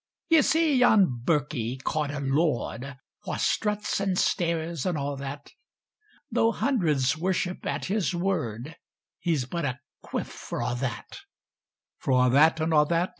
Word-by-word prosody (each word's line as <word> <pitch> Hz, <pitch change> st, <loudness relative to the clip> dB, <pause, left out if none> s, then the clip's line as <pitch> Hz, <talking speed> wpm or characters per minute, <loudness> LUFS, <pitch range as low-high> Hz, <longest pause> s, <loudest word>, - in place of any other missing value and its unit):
Ye 325 Hz, -2 st, +6 dB
see 315 Hz, -1 st, +3 dB
yon 200 Hz, -, +4 dB
birkie, 140 Hz, -6 st, 0 dB
ca'd 150 Hz, +2 st, -2 dB
a 145 Hz, 0 st, -4 dB
lord, 135 Hz, -2 st, -1 dB, 0.3 s
Wha -, -, -2 dB
struts, 210 Hz, -1 st, 0 dB
and 195 Hz, -2 st, 0 dB
stares, 165 Hz, -4 st, 0 dB
and 180 Hz, -4 st, -1 dB
a' 140 Hz, 0 st, -2 dB
that; 140 Hz, +1 st, -7 dB, 0.8 s
Tho' 230 Hz, 0 st, +2 dB
hundreds 160 Hz, -, +1 dB
worship 180 Hz, +2 st, -2 dB
at -, -, -2 dB
his 195 Hz, -2 st, 0 dB
word, 160 Hz, -, -2 dB, 0.4 s
He's 155 Hz, -7 st, 0 dB
but 170 Hz, +6 st, -4 dB
a 130 Hz, -1 st, -2 dB, 0.2 s
cuif -, -, -3 dB
for -, -, -7 dB
a' -, -, -1 dB
that: 125 Hz, +1 st, -5 dB, 0.8 s
For 125 Hz, -1 st, +3 dB
a' 125 Hz, -, +3 dB
that, 155 Hz, +5 st, +5 dB
and 160 Hz, +1 st, 0 dB
a' 150 Hz, -1 st, +6 dB
that. 170 Hz, +3 st, 0 dB
160 Hz, 150 wpm, -27 LUFS, 135-185 Hz, 0.8 s, Ye